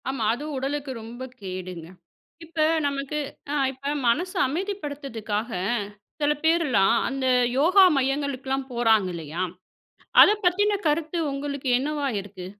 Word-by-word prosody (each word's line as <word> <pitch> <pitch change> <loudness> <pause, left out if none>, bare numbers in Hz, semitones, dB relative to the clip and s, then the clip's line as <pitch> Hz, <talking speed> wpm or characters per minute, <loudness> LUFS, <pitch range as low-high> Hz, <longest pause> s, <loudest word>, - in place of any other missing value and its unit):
ஆமா, 265 -4 -2
அதுவும் 295 +4 -5
உடலுக்கு 275 +1 -3
ரொம்ப 235 +3 -8 0.2
கேடுங்க. 185 -3 -6 0.6
இப்ப 325 -1 -3 0.2
நமக்கு 280 +1 -2 0.3
அ, - - -1 0.2
இப்ப 275 +2 -4
மனசு 355 - +1
அமைதிப்படுத்துக்காக, 275 - -4 0.7
சில 295 0 +3
பேர்லாம், 280 - +3
அந்த 270 0 -3 0.3
யோகா 365 +7 +6
மையங்களுக்குல்லாம் 270 0 -1
போறாங்க 225 -4 +3
இல்லையா? 165 +2 -4 0.8
அத - - +8
பத்தின 405 +3 +2
கருத்து 315 +2 -1
உங்களுக்கு 280 -1 -4
என்னவா 290 +1 -2
இருக்கு? 190 -2 -9
275 Hz, 115 wpm, -25 LUFS, 230-300 Hz, 0.8 s, அத